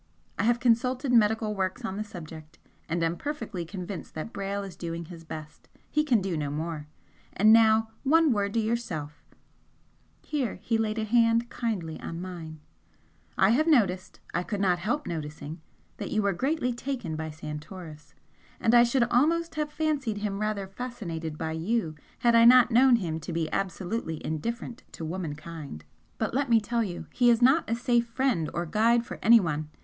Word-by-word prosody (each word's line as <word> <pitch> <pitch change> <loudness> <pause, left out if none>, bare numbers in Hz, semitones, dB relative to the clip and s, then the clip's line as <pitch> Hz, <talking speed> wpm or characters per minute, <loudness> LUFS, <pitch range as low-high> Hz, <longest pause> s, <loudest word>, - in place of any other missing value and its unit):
I - - +2
have 240 +1 +3
consulted 250 +2 +2
medical 220 -1 +3
works 195 +5 -2
on 190 - -3
the 210 - -2
subject 160 -5 -10 0.3
and 165 +1 0
am 165 +1 +1
perfectly 225 - -4
convinced 185 +1 -7
that 160 +10 -5
Brayle 200 -1 -3
is 195 -3 -8
doing 170 0 -5
his 165 0 -11
best. 155 -1 -9 0.2
He 300 - +2
can 250 -8 +3
do 190 -2 -2
no 150 -2 -2
more. 155 0 -4 0.5
And 215 +3 +6
now 220 0 +5
one 315 +2 +4
word 200 -2 0
to - - +3
yourself;" 210 -10 -3 1.0
here 280 -6 -2
he 230 - 0
laid 220 0 -1
a 220 - 0
hand 230 +1 +3
kindly 185 -10 -3
on 165 - -5
mine 165 -4 -7 0.8
"I 190 - +5
have 305 +7 +3
noticed 195 - +2
I - - +1
could 205 +3 -4
not 180 -3 +2
help 245 +12 -1
noticing 155 -1 -6 0.4
that - - -5
you 215 -1 0
were 200 -1 +2
greatly 260 - 0
taken 240 - -4
by 160 0 -4
Santoris 150 0 -9 0.4
and 225 - +2
I 240 - +8
should 240 +1 +2
almost 315 +8 +2
have 300 -1 -2
fancied 300 -8 -1
him 205 -1 -3
rather 215 -2 -1
fascinated 190 -8 -5
by 160 0 -3
you 165 +2 -1 0.2
had 240 -2 +3
I 230 0 +7
not 245 0 +7
known 250 +2 +6
him 165 -8 -2
to 160 - -7
be 165 -1 -2
absolutely 185 -3 -2
indifferent 230 +9 -4
to 165 - -6
womenkind. 155 - -6 0.3
But 220 - -2
let 275 0 0
me 230 -1 +6
tell 235 +2 -1
you 180 -5 -5
he 245 -1 +4
is 230 -1 +5
not 255 -1 +4
a 230 - +1
safe 240 0 +1
friend 230 - 0
or 170 +1 -2
guide 230 +6 +2
for - - -8
anyone. 165 -10 +4
210 Hz, 180 wpm, -27 LUFS, 165-235 Hz, 1.0 s, I